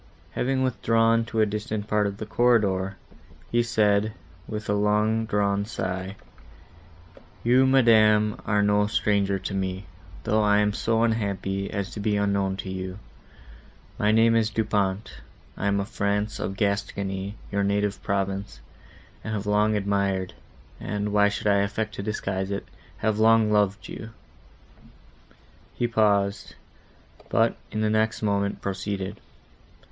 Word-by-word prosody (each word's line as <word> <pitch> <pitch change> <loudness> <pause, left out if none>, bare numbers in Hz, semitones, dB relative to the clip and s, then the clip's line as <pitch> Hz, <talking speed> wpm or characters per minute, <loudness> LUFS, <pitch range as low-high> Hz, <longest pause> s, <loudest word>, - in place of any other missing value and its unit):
—Having 130 +1 0
withdrawn 115 -2 +2
to 115 -1 -1
a - - +5
distant 105 0 -4
part 105 -1 +2
of 100 0 -5
the 110 - -5
corridor, 100 -5 +2 0.5
he 120 - +3
said, 105 -2 +2 0.3
with 105 0 -5
a 105 - +1
long 105 +2 +1
drawn 100 -1 +1
sigh, 95 -3 -4 1.3
"You, 125 +3 +4
madam, 110 -5 +4
are 105 -1 +2
no 105 0 +3
stranger 100 -2 +1
to 95 - -5
me, 95 0 -3 0.4
though 110 +1 +2
I 105 -1 +4
am 105 0 +2
so 115 +1 +1
unhappy 100 -3 -1
as 100 +2 -3
to - - -7
be 105 0 0
unknown 100 -1 0
to - - -5
you.—My 90 - -6
name 115 +1 +4
is 110 -1 +2
Du 110 - 0
Pont; 100 -1 -2 0.3
I - - -2
am 100 0 +2
of 100 - -3
France, 105 -1 -1
of 95 - -4
Gascony, 100 -1 -2 0.2
your 100 0 0
native 100 0 0
province, 100 0 -2 0.6
and 110 - -3
have 100 -1 -4
long 105 +1 +2
admired,—and, 100 +1 -3
why 105 0 +5
should 100 - -5
I 100 -1 +4
affect 105 +2 -1
to 105 - -5
disguise 95 -2 -3
it?—have 105 +1 -4
long 110 -1 +5
loved 105 -1 +1
you." 110 - -8 1.7
He 120 - 0
paused, 105 -3 +1 0.7
but, - - +2 0.2
in 110 - -2
the 110 - +2
next 110 +1 0
moment, 100 -1 -1
proceeded. 100 +1 -4
105 Hz, 140 wpm, -25 LUFS, 100-110 Hz, 1.7 s, a